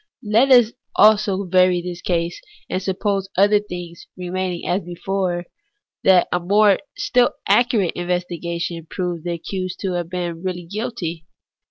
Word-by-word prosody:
Let 225 +5 +3
us 240 -3 +7 0.6
vary 185 -2 +2
this 175 -1 -6
case 170 -1 -1
also, 425 0 -26
and 185 - -1
suppose, 195 0 -1
other 205 +2 +5
things 175 -4 -8
remaining 180 -1 -3
as 185 +3 +1
before, 175 0 -3 0.6
that 185 -2 +5
a 175 - +1 0.6
still 250 -4 +3
more - - -25
accurate 235 -8 +3
investi 175 -1 -3
gation 170 -1 -4
proved 175 -3 -4
the 175 - -1
accused 185 +2 -5
to 190 - -1
have 175 -2 -3
been 175 -2 -4
really 180 -2 -4
guilty. 175 -5 -5
180 Hz, 145 wpm, -21 LUFS, 175-195 Hz, 0.6 s, us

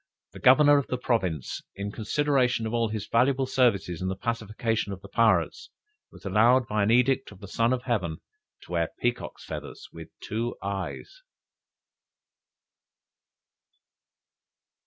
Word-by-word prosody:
the - - -11
Governor 145 +2 +6
of 140 - -4
the 125 - -2
province, 95 - -2
in 100 +1 -4
consideration 125 +1 +1
of 115 0 0
his 110 -2 -4
valuable 130 +4 +2
services 115 -10 +1
in 95 - -2
the 95 - -2
pacification 110 0 -2
of 95 -1 -7
the - - -9
pirates, 115 - +1 0.4
was - - -16
allowed 115 +6 +4
by 105 -1 0
an 100 - +2
edict 125 +2 +2
of 100 - -14
the 100 - -10
"Son 115 +4 +1
of 125 -1 -1
Heaven," 95 -11 -1 0.5
to - - -15
wear 85 -2 0
peacocks' 120 0 -3
feathers - - -8
with 80 -1 -10
two 115 +3 -3
eyes! 100 - -5
115 Hz, 135 wpm, -27 LUFS, 100-125 Hz, 0.5 s, Governor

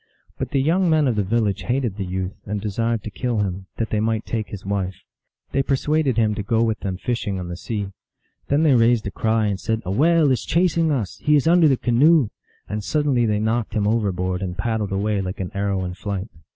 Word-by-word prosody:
But - - -2
the 140 - +1
young 175 +4 +2
men 155 -3 +3
of 120 - +1
the 105 - +1
village 105 -1 0
hated 120 0 -1
the 100 - -2
youth, 95 +1 -3
and 105 +1 -2
desired 115 +2 -1
to 110 - -6
kill 120 -1 -1
him, 95 -1 -3
that 115 - -2
they 105 - +1
might 110 0 0
take 110 -2 -3
his 100 -2 -9
wife. 95 -2 -2 0.6
They 135 - +2
persuaded 140 -1 +1
him 110 -2 +3
to 105 - -3
go 115 +3 +1
with 110 -2 0
them 95 -2 -3
fishing 105 -3 -2
on 90 -1 -5
the 85 - -4
sea. 100 0 -4 0.6
Then 145 +3 +2
they 150 -4 +5
raised 115 -2 +3
a 100 - -3
cry, 110 +1 +1
and 100 -2 -1
said, 110 +3 -2
" - - -32
A 90 - -2
whale 155 - +4
is 130 - 0
chasing 165 -2 +2
us! 115 -9 -2
he 150 - +3
is 145 +1 +2
under 170 -1 +6
the 135 -3 +3
canoe! 130 +2 +4 0.2
" - - -37
and 105 +1 -4
suddenly 140 -3 +1
they 105 -1 +1
knocked 110 +1 -1
him 105 -2 +1
overboard, 95 -4 0
and 90 -2 -4
paddled 110 -4 -1
away 100 +1 0
like 95 +1 -5
an 95 -2 -4
arrow 100 -1 -1
in 90 - -4
flight. 100 +2 -4
110 Hz, 235 wpm, -22 LUFS, 100-130 Hz, 0.6 s, under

